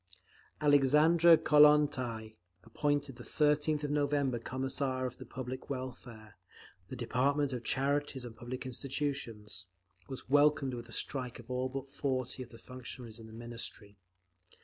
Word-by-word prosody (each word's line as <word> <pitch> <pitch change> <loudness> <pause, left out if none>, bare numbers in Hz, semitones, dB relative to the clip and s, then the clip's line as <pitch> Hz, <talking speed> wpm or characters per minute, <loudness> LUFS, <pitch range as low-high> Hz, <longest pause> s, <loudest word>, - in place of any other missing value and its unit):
Alexandra 150 +4 +6
Kollontai, 145 -8 +4 0.3
appointed 145 -1 -1
the - - -9
13th 150 0 +1
of 145 - -1
November 145 -4 +1
Commissar 130 +1 -2
of 125 -1 -6
Public 130 +1 -6
Welfare—the 110 -6 -9
department 135 +4 +1
of 120 -1 -4
charities 140 -1 0
and 115 -2 -9
public 125 +2 -6
institutions—was 105 -7 -5
welcomed 145 -1 +4
with 120 -1 -7
a - - -11
strike 125 0 -1
of 120 +1 -11
all 130 +1 -1
but 135 +1 -6
forty 130 -2 -2
of 125 - -8
the 115 - -13
functionaries 125 -2 -9
in 110 - -11
the - - -13
Ministry. 115 -3 -6
130 Hz, 125 wpm, -32 LUFS, 120-145 Hz, 0.3 s, Alexandra